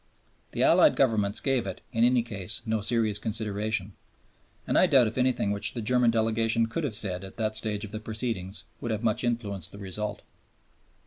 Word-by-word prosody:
The - - 0
Allied - - +5
governments 110 -6 +2
gave 130 -6 0
it, 95 - -6
in 115 - +2
any 125 -1 +4
case, 105 -1 -5
no 110 -1 -1
serious 110 -1 +1
consideration, 105 -2 -3 0.7
and - - -1
I - - +5
doubt 130 -3 +5
if 110 - -3
anything 125 -5 +1
which 100 +4 0
the 120 - -3
German 125 +2 +3
delegation 115 0 +2
could 115 +9 -4
have 120 -7 -2
said 95 -4 +1
at 95 - -11
that 110 -1 -1
stage 110 -1 -1
of 100 - -10
the 110 - -5
proceedings 110 -3 -4 0.2
would 120 - -4
have 110 0 -2
much 110 +1 +1
influenced 105 -7 -2
the - - -11
result. 105 +1 -5
110 Hz, 190 wpm, -27 LUFS, 105-115 Hz, 0.7 s, Allied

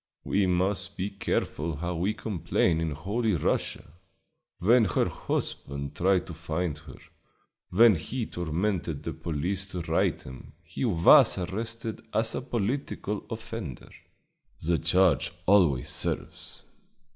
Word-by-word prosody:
We 100 -1 +1
must 90 +2 0
be 95 +3 -2
careful 85 -5 -2
how 90 +4 -3
we 95 +6 0
complain 85 -5 0
in 80 - 0
Holy 100 +8 -1
Russia! 75 -1 -2 0.6
When 115 +5 +5
her 90 - +1
husband 70 0 -3
tried 95 0 +2
to 85 - -8
find 80 0 -2
her, 75 +1 -12 0.7
when 115 +4 +6
he 110 +9 -3
tormented 85 -2 -2
the - - -4
police 90 +5 -2
to 90 -2 -5
right 80 - +1
him, 65 0 -11
he - - -4
was 90 -7 +6
arrested 110 +5 -4
as 110 +1 +1
a - - -2
political 120 -3 -3
offender 110 - -6 0.7
the 85 +1 +1
charge 85 -1 +3
always 85 -10 +4
serves. - - -5
90 Hz, 125 wpm, -28 LUFS, 80-105 Hz, 0.7 s, when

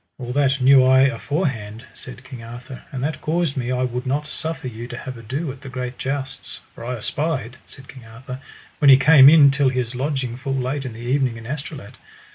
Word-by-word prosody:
All 125 -2 -5
that 140 -1 +2
knew 130 0 +6
I 130 0 +5
aforehand, 125 - -1
said 125 0 -10
King 130 -3 -10
Arthur, 120 +3 -9
and 130 -2 -4
that 150 +2 -3
caused 165 -2 0
me 125 -2 -2
I 125 0 0
would 125 +1 -3
not 145 +3 -1
suffer 155 -2 -5
you 120 0 -7
to 120 - -7
have 130 0 -7
ado 130 +7 -4
at 130 +1 -12
the 140 - -9
great 125 -1 -5
jousts, 135 0 -4
for - - -11
I 125 +2 -3
espied, 130 +1 -3
said 135 -1 -14
King 130 -3 -13
Arthur, 125 +3 -9 0.4
when 145 - +5
he 135 - +10
came 140 -1 +8
in 145 -3 +7
till 140 -1 +2
his 125 -2 -2
lodging 130 -2 -2
full 135 +1 -3
late 135 +2 -2
in 125 - -5
the 110 - -11
evening 125 -1 0
in 115 - -11
Astolat. 140 -4 -7
130 Hz, 215 wpm, -21 LUFS, 125-140 Hz, 0.4 s, he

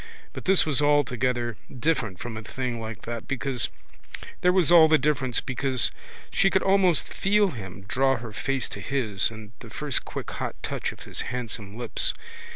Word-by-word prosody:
But - - -8
this 190 0 +5
was 150 -2 +1
altogether 125 -5 +1
different 125 - -1
from 120 0 -6
a 110 - -5
thing 120 +1 -4
like 110 0 -7
that 115 -1 -6
because 135 -3 -1 0.7
there 180 - +4
was 180 -3 +3
all 165 -2 +8
the 155 0 +5
difference 140 -5 0
because 130 -1 +4 0.4
she 195 - +3
could 190 -1 +1
almost 190 -6 +3
feel 205 0 +2
him 95 -5 -9
draw 135 +6 +2
her 115 -1 -8
face 135 +4 -1
to - - -6
his 115 -8 0
and 110 -2 -11
the 115 - -11
first 145 +4 -1
quick - - -6
hot - - -4
touch - - -3
of - - -14
his - - -2
handsome 110 -4 -5
lips. 120 -2 -1
130 Hz, 175 wpm, -26 LUFS, 115-150 Hz, 0.7 s, all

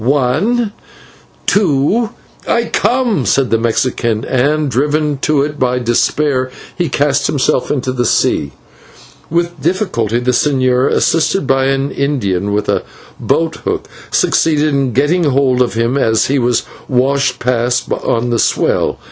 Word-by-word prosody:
One, 150 - +1 0.7
two 200 - +2 0.2
" - - -25
"I 235 0 +1
come," 240 - +1
said 135 -2 +1
the 115 - +2
Mexican, 115 -1 -1
and, 145 +3 0
driven 145 +3 0
to 145 -1 +1
it 150 0 -5
by 125 -1 +1
desperation, 130 +2 0 0.2
he 175 -4 -1
cast 140 +1 +1
himself 140 -3 0
into 130 -2 -1
the 120 -2 0
sea. 70 - +1 0.8
With 170 -1 -2
difficulty 145 - 0
the 125 +1 0
señor, 130 -1 +2
assisted 165 +2 +1
by 135 0 +2
an 135 +1 0
Indian 100 -10 -1
with 105 0 -1
a - - +1 0.4
boathook, 165 -1 -1 0.2
succeeded 155 -1 +2
in 135 -4 0
getting 155 +7 +2
hold 130 -2 +2
of 120 -2 0
him 115 +4 0
as 110 -3 +2
he 140 +1 +1
was 120 -1 +1 0.3
washed 135 +2 +1
past 125 0 -1
on 120 +1 -1
the 115 - +1
swell. - - +1
135 Hz, 140 wpm, -15 LUFS, 125-150 Hz, 0.8 s, two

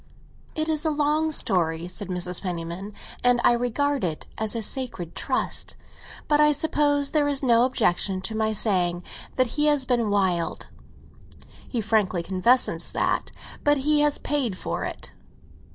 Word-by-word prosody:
"It 310 0 -1
is 310 -1 0
a 320 - +2
long 305 +1 +1
story," 170 - +1
said 180 +2 -5
Mrs. 180 -1 -2
Penniman, 175 +2 -5 0.3
"and 245 0 +4
I - - +5
regard 255 +3 0
it 160 -4 -3
as 220 +1 -2
a 230 - -2
sacred 210 -9 -2
trust. - - -1 0.5
But 295 -1 +3
I 300 0 +5
suppose 290 -1 +2
there 295 -2 +2
is 280 -1 0
no 240 -1 +4
objection 195 -6 +1
to 220 +4 -4
my 220 0 0
saying 180 -5 +1 0.3
that 255 +1 0
he 300 - +4
has 290 -3 +3
been 240 -4 +1
wild—he 195 +5 -4
frankly 205 -5 +1
confesses 195 +8 +2
that. - - 0 0.3
But 290 0 +3
he 300 0 +4
has 295 -1 +3
paid 260 -10 -2
for - - -3
it." - - -7
230 Hz, 150 wpm, -24 LUFS, 185-290 Hz, 0.5 s, I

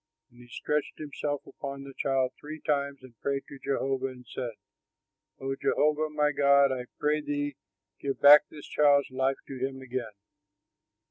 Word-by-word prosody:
And 120 - -20
he 120 - -14
stretched 150 +4 -2
himself 145 -1 -4
upon 140 -1 -7
the 140 0 -10
child 130 -2 +1
three 155 +1 -8
times 140 -3 -1
and 125 -2 -14
prayed 140 -1 -1
to 140 - -11
Jehovah 135 -1 -1
and 125 -1 -10
said, 120 -2 -5 0.9
"O 135 0 -2
Jehovah, 150 +3 +1
my 150 -1 +1
God, 140 -1 +5
I 125 -1 -3
pray 150 +1 +1
thee, 145 -1 -2 0.4
give 140 -1 -3
back 145 +1 +9
this 150 -2 -11
child's 145 -2 +3
life 130 +1 +1
to 135 -2 -7
him 135 +1 -3
again." 125 -4 -5
140 Hz, 160 wpm, -29 LUFS, 130-145 Hz, 0.9 s, back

